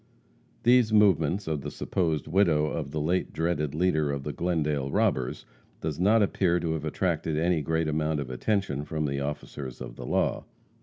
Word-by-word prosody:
These 120 -2 +5
movements 95 -4 +3
of 75 -3 -1
the 75 - -5
supposed 80 -2 -1
widow 80 -4 +3
of 75 -2 -3
the 75 +1 -3
late 85 +5 0
dreaded 75 -3 -1
leader 80 -4 +1
of 70 -1 -3
the 75 - -4
Glendale 75 -6 -1
robbers 65 -2 0 0.3
does 80 -1 -4
not 105 +4 +4
appear 90 -3 +1
to 80 -1 -1
have 80 -1 -3
attracted 80 -1 -1
any 85 0 +2
great 80 +2 0
amount 75 0 0
of 65 -3 -5
attention 75 - -1
from 75 0 -2
the 70 -1 -1
officers 70 -2 -5
of - - -8
the 60 - -7
law. - - 0
80 Hz, 175 wpm, -27 LUFS, 75-90 Hz, 0.3 s, These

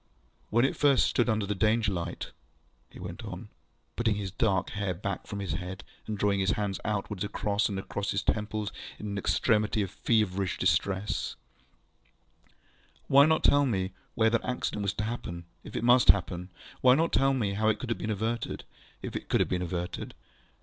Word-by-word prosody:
ŌĆ£When 120 +3 +4
it - - 0
first 140 -3 +4
stood 120 0 +2
under 110 -2 +1
the 105 - -1
Danger 110 +1 +2
light, 85 -1 -4 0.6
ŌĆØ - - -28
he - - -11
went - - -7
on, - - -7 0.5
putting 115 -3 +1
his 100 -2 -4
dark 95 -3 +1
hair 100 -3 -2
back 100 +2 -4
from 100 - -5
his 95 -5 -3
head, 90 +2 -5 0.2
and 110 -1 -3
drawing 100 0 +2
his 95 +1 +2
hands 100 -2 -2
outward 105 -2 -2
across 105 +1 0
and 100 - -3
across 100 +1 -3
his 100 - 0
temples 105 -1 -1 0.3
in - - -8
an 100 - -3
extremity 105 0 +2
of 95 - -5
feverish 100 -4 +1
distress, 95 +2 0 1.8
ŌĆ£why 140 +2 +8
not 160 0 +2
tell 145 0 +5
me 95 -5 -1 0.2
where 110 0 +3
that 115 - +1
accident 125 -4 -2
was 100 -1 0
to - - -3
happen, 85 -7 -5 0.2
ŌĆöif - - -10
it - - -2
must 125 +1 +5
happen? 90 0 +3 0.3
Why 125 0 +7
not 165 +3 +1
tell 135 0 +4
me 105 -6 0
how 110 +2 +1
it 110 - +2
could 115 -2 -2
be 110 - -4
averted, 110 +3 -2 0.4
ŌĆöif - - -5
it - - -5
could - - +3
have - - +2
been 90 -1 0
averted? 90 0 -4
105 Hz, 190 wpm, -29 LUFS, 95-115 Hz, 1.8 s, ŌĆ£why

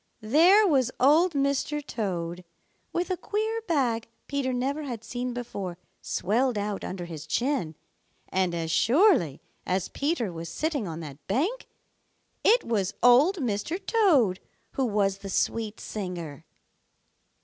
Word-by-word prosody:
There 340 - +6
was 265 -7 +3
Old 315 +6 +5
Mr. 280 +1 0
Toad 180 -7 -3 0.5
with 355 +2 -1
a 370 - 0
queer 435 +4 -2
bag 245 -8 +1 0.2
Peter 280 -2 -1
never 265 +4 -1
had 240 -6 -5
seen 245 +2 -4
before 205 -7 -5 0.2
swelled 240 +3 0
out 205 -1 -3
under 180 -2 -5
his 160 -2 -8
chin, 240 - -1 0.5
and 185 -2 0
as 165 -1 -2
surely 245 - +3 0.2
as 185 0 -1
Peter 280 - -1
was 165 0 -6
sitting 290 - -2
on 165 0 -5
that 145 -2 -10
bank, 335 - -1 0.8
it 470 +3 +5
was 205 -5 -1
Old 260 +10 +6
Mr. 255 - -2
Toad 290 - +3 0.3
who 265 - 0
was 200 -2 +1
the 195 - -7
sweet 220 +3 -1
singer! 175 -8 -6
240 Hz, 135 wpm, -27 LUFS, 190-295 Hz, 0.8 s, There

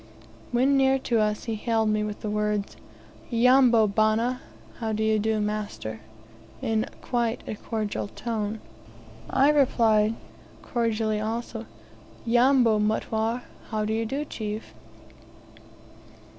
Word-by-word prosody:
When 260 +3 +3
near 270 0 +4
to 240 -3 0
us, 210 0 0
he 230 - -3
hailed 220 0 0
me 215 0 +1
with 210 -1 -5
the 215 - -3
words, 210 -1 -1 0.5
"Yambo, 240 -1 +5
bana? 220 +4 +1 0.4
How 220 -2 -2
do 215 +1 -1
you 220 0 +2
do, 220 +1 0
master?" 210 - -3 0.6
in 225 -2 0 0.2
quite 240 -2 -1
a - - -3
cordial 215 -1 -3
tone. 220 -1 -4 0.7
I 275 +3 +4
replied 225 -6 +3 0.5
cordially 225 -3 0
also, 225 +1 -4 0.6
"Yambo, 240 -2 +4
mutware? 220 +2 0 0.3
How 215 -1 -1
do 215 - -1
you 225 0 -1
do, 280 +5 -2
chief?" 215 -5 -6
220 Hz, 120 wpm, -26 LUFS, 215-240 Hz, 0.7 s, Yambo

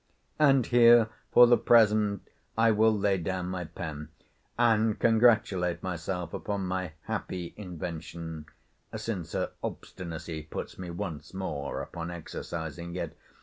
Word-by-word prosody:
And 135 -5 +5
here, 120 -2 +6 0.2
for 120 - +9
the 120 0 +5
present, 105 -3 +4 0.3
I 115 0 +5
will 110 +1 +4
lay 100 -2 +2
down 90 +1 -3
my 90 -1 -3
pen, 75 -2 -7 0.5
and 110 -2 +3
congratulate 110 -6 +3
myself 90 -1 -4
upon 100 -2 -3
my 90 -3 -3
happy 90 +2 -4
invention 85 -4 -6 0.5
(since 95 -8 -4
her - - -1
obstinacy 80 -2 -6
puts 75 +4 -7
me 90 -1 -6
once 85 -1 -6
more 75 -7 -3
upon 85 0 -6
exercising 85 0 -6
it.) 85 -3 -4
90 Hz, 125 wpm, -29 LUFS, 85-110 Hz, 0.5 s, for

